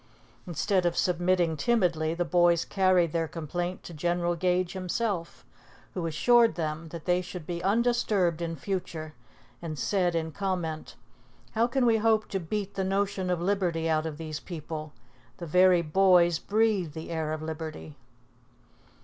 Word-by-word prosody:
Instead 180 +3 0
of 175 - -2
submitting 175 -2 +2
timidly, 165 -3 +1
the 175 +1 -1
boys 175 -1 +3
carried 185 -4 +2
their 165 0 0
complaint 175 +3 -4
to 175 - -9
General 175 +2 0
Gage 180 +1 0
himself, 185 -1 -3 0.5
who 175 -3 -2
assured 235 +5 +4
them 160 -1 -3
that 165 0 -9
they 180 0 +2
should 180 -2 -8
be 170 +1 -4
undisturbed 205 -5 +1
in 165 -1 -3
future 160 -2 -4 0.5
and 155 -3 -5
said 180 0 +1
in 160 -1 -1
comment, 175 -4 -3 0.6
"How 230 +1 +2
can 255 +1 +1
we 230 -2 +4
hope 220 0 +2
to 195 - -2
beat 200 +3 -4
the 195 - -2
notion 195 -1 -1
of 180 -1 0
liberty 175 -4 0
out 160 0 +1
of 155 -2 -6
this 155 -1 -5
people? 155 -2 -7 0.5
The 170 - -6
very 180 +1 +4
boys 175 0 +4
breathe 205 -7 +1
the 160 +1 -7
air 160 -2 -2
of 155 0 -4
liberty!" 155 -1 -6
175 Hz, 155 wpm, -28 LUFS, 160-190 Hz, 0.6 s, assured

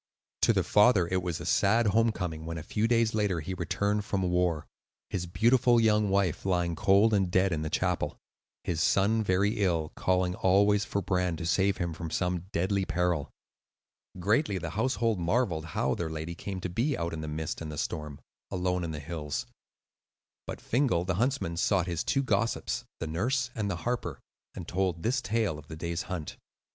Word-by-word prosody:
To - - +5
the - - +1
father 105 -4 +4
it 95 0 +1
was 85 -3 -3
a - - -7
sad 115 +4 +3
home 115 +3 +3
coming 80 -6 -4
when, 85 +1 -5
a 80 - -6
few 105 +7 0
days 115 -1 +2
later, 105 -5 +1
he 85 +5 -5
returned 100 +4 -1
from 100 -2 -1
war,—his 90 0 -3
beautiful 120 +6 +4
young 105 -2 +3
wife 95 -4 +1
lying 90 -3 0
cold 100 +6 +4
and 95 -3 +2
dead 95 +1 +2
in 80 -2 -1
the 80 - -2
chapel; - - -1 0.5
his 85 -2 -1
son 105 +6 +3
very 100 +3 +1
ill, 85 -4 0
calling 90 -1 +1
always 100 +2 +3
for 100 - -2
Bran 90 -2 0
to 80 - -5
save 95 +3 +2
him 85 -2 -2
from 80 +1 -6
some 90 +1 -1
deadly 95 +3 0
peril. 90 -5 0 0.9
Greatly 105 - +1
the 85 -2 -4
household 115 -2 0
marvelled 85 -3 0
how 65 -4 -1
their 80 +4 -3
lady 80 +1 -5
came 95 +2 -6
to 90 - -3
be 120 - 0
out 85 0 -3
in 80 - -4
the 80 - -5
mist 75 +1 -4
and 80 -1 -5
the 75 - -7
storm, 75 -1 -4 0.3
alone 90 -1 -1
on 85 - -3
the 75 -2 -4
hills; 75 -1 -4 1.0
but - - -5
Fingal, 115 -9 +1
the 95 - 0
huntsman, 125 -10 0
sought 90 +1 +2
his 85 -3 -2
two 135 - +1
gossips, 120 -3 -1
the - - -3
nurse 120 - -1
and 105 -3 -2
the 95 - -1
harper, 100 - -2 0.4
and 85 - -7
told 90 -2 -1
this 130 +3 +1
tale 105 -7 -1
of 75 - -15
the 80 - -7
day's 85 +1 -3
hunt. 90 -5 -5
90 Hz, 190 wpm, -29 LUFS, 85-105 Hz, 1.0 s, To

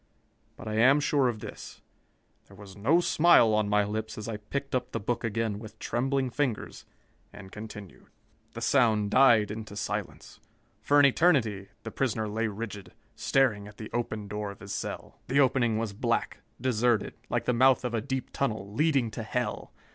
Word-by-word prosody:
But - - -10
I 110 0 -2
am 135 +5 +6
sure 145 -2 +2
of 110 -3 -3
this: - - -10 0.6
There 100 - -16
was 100 -2 -12
no 135 +12 +3
smile 155 -10 +5
on 105 -1 +1
my 105 0 +3
lips 110 +1 -4
as 110 - -6
I 110 -2 -4
picked 135 +7 -5
up 125 -1 -2
the 115 - -1
book 120 +3 -2
again 115 -2 -2
with 110 -1 -11
trembling 130 +3 -1
fingers 130 -5 -3 0.5
and 100 -2 -12
continued. 105 -3 -10 0.5
"The 115 - -7
sound 110 -5 +2
died 115 -6 +5
into 105 -1 -7
silence. 105 -1 -5 0.4
For 145 +6 +4
an 145 - +7
eternity, 125 - +2 0.2
the 115 - -6
prisoner 110 -4 -1
lay 110 +2 -1
rigid, 105 -1 -7 0.2
staring 110 -7 +1
at 105 - -14
the 110 - -8
open 110 -3 -3
door 105 0 -4
of 100 - -10
his 100 0 -7
cell. - - -6
The 140 - +2
opening 125 -5 +3
was 110 -2 -3
black, 100 - -1 0.2
deserted, 120 -2 +1 0.2
like - - -1
the 125 - +2
mouth 130 +1 +4
of 120 - -2
a 115 - 0
deep 130 +3 -4
tunnel, 110 -6 -2
leading 140 -4 +1
to 115 - -5
hell. 125 +3 -3
115 Hz, 180 wpm, -28 LUFS, 105-130 Hz, 0.6 s, an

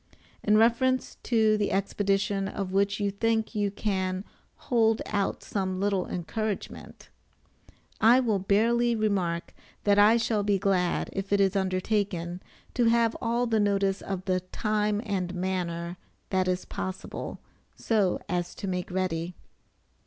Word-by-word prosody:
In 210 0 +3
reference 240 +3 +2
to 220 -3 +3
the 205 -1 0
expedition 195 0 0
of 195 -1 -4
which 200 +1 +1
you 200 -1 0
think 220 +3 0
you 205 -2 0
can 190 -2 -2 0.3
"hold 225 -3 +2
out 200 -2 -1
some 190 -2 -2
little 195 -2 0
encouragement," 200 +5 -5 0.9
I 235 +3 +6
will 220 -6 +1
barely 230 +5 +2
remark, 190 -6 -1 0.3
that 205 0 +4
I 215 +3 +7
shall 225 -2 +1
be 200 -1 +2
glad, 185 -2 0
if 195 0 -4
it 200 - +3
is 195 0 +3
undertaken, 185 -2 -1 0.3
to 245 - +2
have 230 0 +3
all 235 +1 +1
the 225 -2 +1
notice 200 -1 +1
of 190 -1 -5
the 185 -2 +1
time 210 +3 -1
and 185 -3 -2
manner 175 -2 -3 0.3
that 185 -1 +1
is 180 0 -1
possible, 190 0 -5 0.4
so 210 -5 +1
as 175 -1 -2
to 200 - -5
make 180 -1 -3
ready. 180 -2 -2
200 Hz, 140 wpm, -27 LUFS, 185-215 Hz, 0.9 s, I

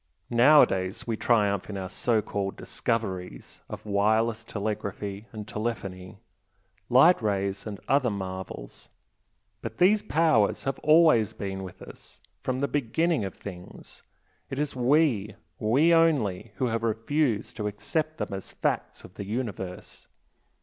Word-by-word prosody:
Nowadays 115 -6 +4
we 115 - -1
triumph 105 -4 +1
in 100 - -4
our 95 -1 -4
so 110 +4 0
called 100 -2 -3
'discoveries' 95 - -4
of - - -8
wireless 110 +2 +1
telegraphy 105 -1 -4
and 110 -2 -7
telephony, 100 -5 -5 0.7
light 135 +8 +6
rays 100 -1 -1
and 100 -2 -6
other 135 -3 +3
marvels 95 - -6 0.7
but - - -6
these 205 +4 +5
powers 155 - +2
have 135 - -2
always 155 - +5
been 95 -1 -5
with 95 -2 -9
us - - -12 0.2
from 130 +1 -2
the 140 - +2
beginning 145 +2 0
of 95 - -6
things, 90 -3 -10 0.5
it 135 - -5
is 150 -1 -2
we, 125 -6 +2 0.2
we 140 +10 +4
only, 130 - +2
who 130 - 0
have 115 -2 -1
refused 115 0 0
to 105 -2 -2
accept 155 +10 -2
them - - -4
as 95 -1 -7
facts - - -2
of - - -13
the 100 - -7
universe. 100 -5 -5
110 Hz, 135 wpm, -27 LUFS, 100-130 Hz, 0.7 s, light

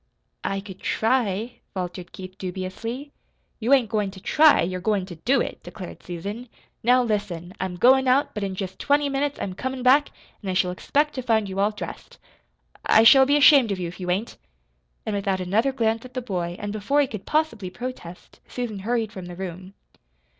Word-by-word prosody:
"I 195 0 -2
could 195 -2 -11
try," 225 -1 0 0.2
faltered 180 -1 -5
Keith 185 0 -9
dubiously. 195 +9 -5 0.5
"You 235 +3 -1
ain't 255 -6 +4
goin' 210 -3 0
to 190 0 -11
TRY, 305 +9 +5
you're 185 +1 -3
goin' 205 -1 0
to 180 -2 -9
DO 245 - +2
it," - - -4
declared 185 -4 -9
Susan. 200 +8 -6 0.3
"Now, 250 +2 +4
listen. 200 -6 -3
I'm 185 -1 -3
goin' 260 +8 +5
out, 265 +3 +3
but 210 - -4
in 195 -1 -3
jest 190 -1 -5
twenty 285 0 +2
minutes 280 +1 -1
I'm 190 - -3
comin' 260 +6 -4
back, 275 +3 +5 0.3
an' 200 - -5
I 185 - -1
shall 180 -1 +2
expect 295 +11 0
to 260 - -3
find 220 -4 +1
you 190 0 -4
all 200 +1 +3
dressed. 210 -1 -8 0.7
I 220 - +5
I - - +4
shall 265 +3 +8
be 285 +1 +4
ashamed 275 -6 +7
of 195 - -1
you 175 -2 -3
if 180 - -12
you 180 -1 -4
ain't." 200 +6 -2 0.7
And 215 - -2
without 195 -1 -1
another 210 +9 +1
glance 225 -3 0
at 255 0 -13
the 255 - -1
boy, 175 -6 -3
and 205 0 -5
before 215 +8 +1
he - - +3
could 215 -7 -8
possibly 300 -12 0
protest, 180 -5 -8
Susan 235 -5 -4
hurried 225 +1 -1
from 190 -4 -8
the 175 - -8
room. 185 +1 -7
210 Hz, 200 wpm, -24 LUFS, 185-255 Hz, 0.7 s, shall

